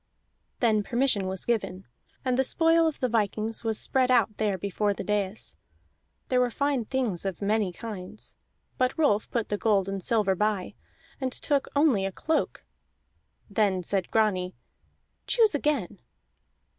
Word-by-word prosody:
Then 220 -3 +3
permission 235 -3 +1
was 190 0 -4
given, 200 -5 -1 0.4
and 255 -1 +2
the 265 - +3
spoil 330 +3 +3
of 315 - -3
the 255 - +2
vikings 220 0 -1
was 220 -2 +1
spread 260 -2 +2
out 225 -4 +3
there 210 -3 0
before 200 +2 -1
the - - -5
dais; 210 0 -2 0.7
there 255 - +3
were 250 -1 +3
fine 280 -1 0
things 235 -8 -1
of 190 -3 -3
many 205 -1 +1
kinds. 210 0 -8 0.4
But 255 +3 +1
Rolf 250 -10 +2
put 235 -3 -2
the 205 - -1
gold 200 -4 +2
and 195 0 -3
silver 210 -1 +2
by, 210 -1 -1 0.5
and 260 -1 -1
took 280 +2 0
only 280 -9 +3
a 195 - -1
cloak. 315 - -2 0.8
Then 200 -3 +1
said 190 +1 -1
Grani: 190 -5 +1 0.7
"Choose 450 -5 +4
again." 275 -10 -1
215 Hz, 150 wpm, -27 LUFS, 195-255 Hz, 0.8 s, Choose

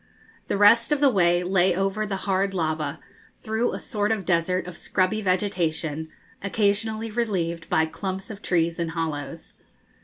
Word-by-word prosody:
The - - 0
rest 230 +5 +5
of 295 - +3
the 280 -2 +5
way 175 -4 +3
lay 185 0 +2
over 195 +3 -1
the 195 - -2
hard 195 0 +1
lava, 155 -4 -1 0.4
through 220 +2 -1
a - - -4
sort 210 -3 -1
of 210 -4 -1
desert 180 +1 +1
of 180 -2 -8
scrubby 190 +5 0
vegetation, 170 -5 -1 0.3
occasionally 215 +2 0
relieved 180 -8 -2
by 160 - +3
clumps 190 +5 -5
of 200 -1 -9
trees 170 -2 0
in 170 - 0
hollows. 160 -2 -4
185 Hz, 155 wpm, -25 LUFS, 165-210 Hz, 0.4 s, rest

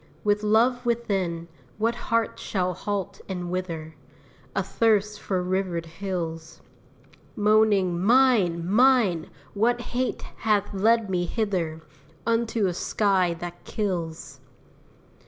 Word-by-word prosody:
With 210 0 +2
love 235 +4 +3
within, 195 -8 -1 0.3
what 225 +2 +1 0.2
heart 230 0 +1
shall 185 -2 -1
halt 200 +2 -4
and 180 -2 -4
wither, 165 -4 -4 0.6
Athirst 210 +1 +1
for 185 -2 -1
rivered 180 -2 -1
hills? 165 -2 -5 0.8
Moaning, 210 -4 +3
"Mine! 210 -8 +4
mine! 215 -6 +3 0.2
what 235 +4 +2
hate 255 +1 -1
hath 210 -2 +1
led 220 +3 +3
me 175 -1 +1
hither 175 -7 -2 0.4
Unto 230 -1 +1
a 180 - 0
sky 185 -2 +1
that 175 0 -7
kills?" 165 - -4
195 Hz, 105 wpm, -25 LUFS, 175-220 Hz, 0.8 s, Mine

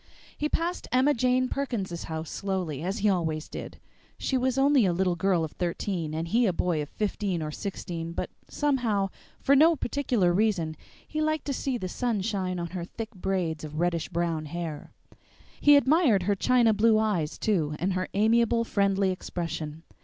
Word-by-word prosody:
He 300 - -1
passed 345 +3 -2
Emma 260 +4 +4
Jane 255 +1 +2
Perkins's 215 -12 -3
house 160 0 -5
slowly, 185 -8 -3
as 190 +5 -2
he - - +6
always 160 -5 -1
did. - - -8 0.4
She 265 - -1
was 260 0 +1
only 275 -2 +5
a 185 -3 +2
little 180 0 +1
girl 175 -1 +1
of 155 - -4
thirteen 170 -2 -3
and 165 +1 -2
he 230 +6 +3
a 185 - +1
boy 170 -2 0
of 145 - -6
fifteen 200 -5 -2
or 155 - -4
sixteen, 170 -2 -5
but - - -4 0.2
somehow, 235 -9 0 0.3
for 280 - +4
no 320 +4 +6
particular 245 - +1
reason, 180 -6 +1 0.3
he 310 - -2
liked 310 -1 0
to 280 - -1
see 265 -1 -1
the 185 - -4
sun 230 +1 -1
shine 190 -3 -2
on 170 -1 -3
her 180 -2 -4
thick 220 +6 -7
braids 180 -6 -2
of 155 0 -6
reddish 170 -1 0
brown 170 -3 -1
hair. 165 -1 -5 0.7
He 290 0 +7
admired 280 - +4
her 205 +3 +2
china 235 +2 +3
blue 220 +1 +4
eyes 200 -8 0
too, 160 -8 0
and 185 +3 0
her 185 0 -2
amiable, 230 +2 +3
friendly 200 -3 +1
expression. 165 -3 -5
195 Hz, 180 wpm, -27 LUFS, 170-240 Hz, 0.7 s, He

